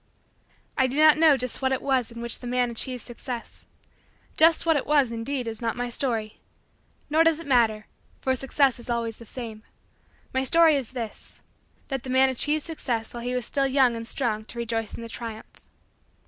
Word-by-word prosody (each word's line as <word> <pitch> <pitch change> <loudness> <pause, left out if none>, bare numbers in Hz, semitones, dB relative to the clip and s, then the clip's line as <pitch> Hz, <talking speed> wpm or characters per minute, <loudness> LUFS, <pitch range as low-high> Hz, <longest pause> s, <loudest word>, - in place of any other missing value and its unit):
I 260 - +4
do 260 +3 -4
not 310 0 +6
know 315 -4 +6
just 250 +1 -1
what 265 0 +1
it 265 - +1
was 260 -4 +1
in 235 0 -7
which 235 -1 -2
the 245 - -8
man 245 0 +1
achieved 250 +2 -3
Success. 240 0 -7 0.7
Just 325 +1 +5
what 325 -1 +4
it 285 - -1
was, 285 -5 +3
indeed, 235 +2 -3
is 225 0 -4
not 230 -1 -1
my 245 0 -3
story; 230 -4 -1 0.7
nor 315 +2 +4
does 325 -1 +3
it 335 - -9
matter 230 -5 +2 0.3
for 260 0 0
Success 270 0 +1
is 240 - -11
always 230 -2 -2
the 230 - -13
same. 225 -3 -7 0.7
My 260 0 +1
story 325 +3 +5
is 260 -3 -3
this: 230 -4 -7 0.5
that 270 -2 -2
the 260 - -9
man 260 +1 +4
achieved 295 +4 0
Success 245 -9 -3
while 240 - -6
he 250 +1 -2
was 250 -3 -2
still 275 +1 0
young 260 -3 +3
and 230 0 -6
strong 225 -4 -1
to 240 - -9
rejoice 225 -2 -2
in 230 - -8
the - - -6
triumph. 225 -1 -8
250 Hz, 200 wpm, -25 LUFS, 230-275 Hz, 0.7 s, not